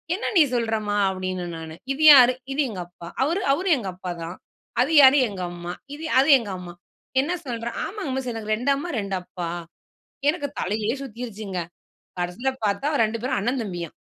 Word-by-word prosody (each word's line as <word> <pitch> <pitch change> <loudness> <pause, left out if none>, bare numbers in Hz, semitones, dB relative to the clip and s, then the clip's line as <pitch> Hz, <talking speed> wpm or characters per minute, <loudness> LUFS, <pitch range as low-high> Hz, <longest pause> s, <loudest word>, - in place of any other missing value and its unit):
என்ன 420 - -2
நீ - - +8
சொல்றம்மா? 220 -3 0
அப்படின்னே 185 -1 -3
நானு. 160 -1 -8 0.2
இது 295 +3 -2
யாரு? 255 -2 +8 0.2
இது 290 - +1
எங்க 200 -5 -6
அப்பா. 175 -1 -12 0.2
அவரு? 335 +8 0
அவரு 370 +7 -1
எங்க 220 -6 -5
அப்பாதான். 175 -1 -6 0.5
அது 265 +5 +1
யாரு? 270 +1 +8
எங்க 195 -3 -6
அம்மா. 175 0 -6 0.2
இது? 315 +2 -7
அது 275 +3 +4
எங்க 225 -4 -7
அம்மா. 180 -1 -9 0.5
என்ன 310 +6 -2
சொல்ற? 235 -2 -3 0.2
ஆமாங்க 395 -8 -5
மிஸ் 260 -2 -3
எனக்கு 215 -1 -2
2 250 +6 0
அம்மா, 290 +6 -4
2 200 -2 -3
அப்பா. 175 -1 -5 0.8
எனக்கு 295 -3 -4
தலையே 210 +3 -1
சுத்தீருச்சுங்க! 220 -6 -5 0.6
கடைசியில 180 +10 -1 0.2
பார்த்தா, 205 +8 0 0.2
2 220 +1 -2
பேரும் 255 +2 0
அண்ணன் 245 +5 0
தம்பியாம். 175 -6 -5
220 Hz, 170 wpm, -24 LUFS, 185-265 Hz, 0.8 s, நீ